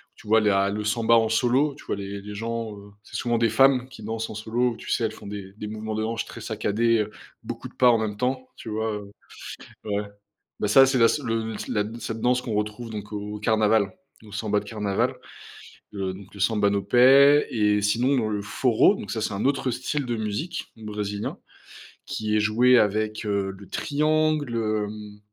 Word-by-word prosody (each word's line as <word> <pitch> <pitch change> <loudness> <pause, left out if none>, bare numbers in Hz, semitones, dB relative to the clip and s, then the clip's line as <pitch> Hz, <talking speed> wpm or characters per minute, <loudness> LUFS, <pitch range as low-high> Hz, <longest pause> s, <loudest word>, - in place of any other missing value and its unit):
tu - - -16
vois, 110 +1 +5
la 100 -2 +3
le 105 +1 -3
samba 115 +2 +3
en 115 -1 +4
solo, 130 +6 +2
tu - - -15
vois? - - -2
Les 100 0 -6
les 105 +1 -8
gens, 115 -1 -4
heu, 100 0 -13
c'est - - -13
souvent 120 -1 0
des 115 -1 +3
femmes 130 +2 +4
qui 120 -5 -12
dansent 110 +1 -3
en - - -7
solo, 115 +3 0
où, - - -12
tu - - -7
sais, 115 - +1
elles 110 - -1
font - - -13
des 100 -1 -7
des 105 - -6
mouvements 110 0 -5
de 110 - -1
hanches 115 +1 -2
très 115 - -10
saccadés, 110 +1 +1
heu, 105 0 -2 0.3
beaucoup - - -7
de - - -18
pas, 125 -1 +5
en 115 - +5
même 110 -2 -2
temps, 130 +2 -2
tu - - -8
vois, 110 +1 -1
heu? 100 -1 -7 0.7
Ouais, 105 -1 -1 0.6
bah, 105 - 0
ça 135 +6 +8
c'est 135 -1 +2
la 115 - +6
s 150 - +1
le 115 -1 -2
la 105 -2 0
d 115 +2 -7
cette 110 0 -5
danse 125 +1 +2
qu'on 115 - -4
retrouve 105 +2 -3
donc 105 -1 -7
au 105 +1 -5
carnaval, 110 -2 +2 0.3
au 105 - -13
samba 105 -1 0
de - - -12
carnaval, 105 -3 -1 0.8
heu, 95 -2 -3
donc 100 +1 -13
le 100 - -10
samba 105 -1 +2
no 100 0 +1
pé 135 +7 +6
et 105 -2 +2
sinon 120 +7 +2
dans 115 -4 0
le 105 -1 -1
forró, 115 +2 +3
donc, 100 - -7
ça, 110 - -2
c'est 105 - -2
un 100 - -2
autre 135 -2 +1
style 130 +3 -2
de 120 -1 -1
musique 110 - -4
brésilien 105 -1 -4 0.7
qui 110 -1 -2
est - - +4
joué 120 +4 +5
avec, 110 +1 0
heu, 100 -1 0
le 100 - -13
triangle, 155 -3 +1
hem, 105 -1 -3
110 Hz, 215 wpm, -25 LUFS, 105-120 Hz, 0.8 s, ça